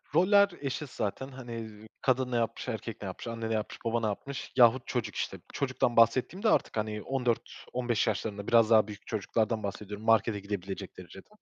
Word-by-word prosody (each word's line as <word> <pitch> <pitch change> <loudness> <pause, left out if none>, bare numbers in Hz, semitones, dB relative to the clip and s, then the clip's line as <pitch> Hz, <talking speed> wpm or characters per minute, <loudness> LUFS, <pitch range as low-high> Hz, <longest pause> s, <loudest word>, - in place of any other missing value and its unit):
Roller 200 +4 +6
eşit 140 +1 -3
zaten. 110 +4 -3
Hani, 120 -3 -8
ııı, 110 -1 -8
kadın 130 -1 +1
ne - - 0
yapmış, 115 +2 -1
erkek 110 -1 -5
ne 100 - -5
yapmış, 95 +5 -6
anne 115 -1 -4
ne - - 0
yapmış, 110 -1 -3
baba 115 +1 +1
ne 110 - 0
yapmış 135 +7 -5
yahut 120 0 +5
çocuk 115 -5 -2
işte. 95 - -2 0.2
Çocuktan 130 -3 0
bahsettiğim 125 - +4
de 220 - +4
artık - - +2
hani 105 0 -2
14-15 120 -2 -1
yaşlarında, 105 -1 -2
biraz 115 -1 +5
daha 110 -2 +6
büyük 105 -1 -10
çocuklardan 110 +1 0
bahsediyorum, 105 +2 -5
markete 110 -1 +3
gidebilecek 100 -1 -5
derecede. 90 +1 -11
115 Hz, 185 wpm, -30 LUFS, 105-125 Hz, 0.2 s, Roller